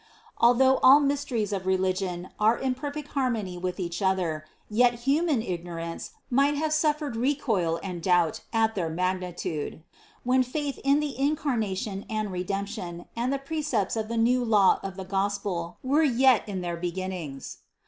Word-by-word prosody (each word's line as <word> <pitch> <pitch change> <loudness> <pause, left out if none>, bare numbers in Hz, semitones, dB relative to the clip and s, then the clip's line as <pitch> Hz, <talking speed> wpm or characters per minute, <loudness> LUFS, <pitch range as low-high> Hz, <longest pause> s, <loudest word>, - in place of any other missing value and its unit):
Al 240 +1 +6
though 265 +1 +5
all 270 +3 +8
mysteries 275 -7 -1
of 190 -1 -3
religion 185 -1 -1
are 220 +2 +4
in 265 -1 0
perfect 290 +2 -6
harmony 230 -9 -1
with 180 +2 -4
each 175 +1 -3
other, 180 -5 0 0.2
yet 240 +2 +2
human 290 -3 +2
ignorance 170 -3 -5 0.2
might 280 +3 +3
have 310 +1 0
suf 310 -1 +2
fered 295 -5 -4
recoil 225 - 0
and 180 -3 -5
doubt 175 -3 +2
at 225 -1 +2
their 175 -5 -2
magnitude, 180 -3 -3 0.4
when 255 +1 +3
faith 280 +2 -3
in 280 +2 +3
the 290 -4 -3
Incarnation 230 -9 -1
and 215 -2 -2
Redemption 185 -1 -4
and 240 +3 -1
the 275 - +1
precepts 275 - -1
of 220 -1 -2
the 230 +1 -3
new 245 +2 +3
law 210 -5 +4
of 195 -1 -6
the 190 0 -6
Gospel 195 -3 -2
were 280 +4 +3
yet 260 -6 +4
in 190 -2 -3
their 175 -1 -3
beginnings. 175 -5 -5
215 Hz, 160 wpm, -27 LUFS, 185-265 Hz, 0.4 s, all